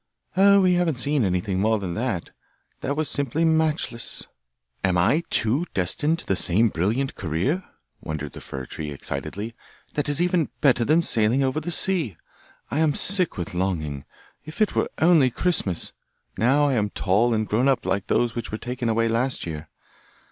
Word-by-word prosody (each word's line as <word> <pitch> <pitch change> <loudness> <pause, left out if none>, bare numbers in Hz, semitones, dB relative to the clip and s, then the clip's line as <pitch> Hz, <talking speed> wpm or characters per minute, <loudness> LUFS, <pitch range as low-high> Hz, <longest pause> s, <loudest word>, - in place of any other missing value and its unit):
'Oh, 200 +1 +6
we 185 -1 +4
haven't 175 -4 +1
seen 140 +2 0
anything 95 0 -1
more 110 +2 +2
than 95 -4 -4
that. 110 -6 -3 0.5
That 140 +2 -3
was 155 -1 0
simply 145 +3 0
matchless!' 160 -7 0 0.6
'Am 95 -2 +2
I 100 - +3
too 135 +11 0
destined 145 - +2
to - - -8
the 95 - 0
same 105 +6 +3
brilliant 110 +11 -1
career?' 95 - -2 0.4
wondered 75 -3 -5
the - - -10
fir 65 -1 -7
tree 75 +4 -6
excitedly. 100 +9 -5 0.4
'That 145 0 -1
is 145 +1 +3
even 175 -3 +1
better 125 -4 +3
than 160 +7 +3
sailing 115 +2 +2
over 130 +3 0
the 175 - -6
sea! 165 - +2 0.5
I 145 - 0
am 155 -3 +2
sick 185 -3 +4
with 90 -1 -5
longing. 80 -7 -2 0.4
If 155 +2 -10
it 215 -2 +2
were - - 0
only 160 -5 +5
Christmas! 120 - 0 0.4
Now 140 +6 +3
I 140 - +1
am 105 -4 0
tall 105 +5 +1
and 110 -1 -1
grown 120 +5 +1
up 135 -3 +1
like 95 +1 -1
those 120 -1 +1
which 120 - -5
were 110 - -3
taken 120 0 -3
away 115 +1 +1
last 120 +3 -1
year. 80 -2 -7
120 Hz, 175 wpm, -24 LUFS, 95-155 Hz, 0.6 s, Oh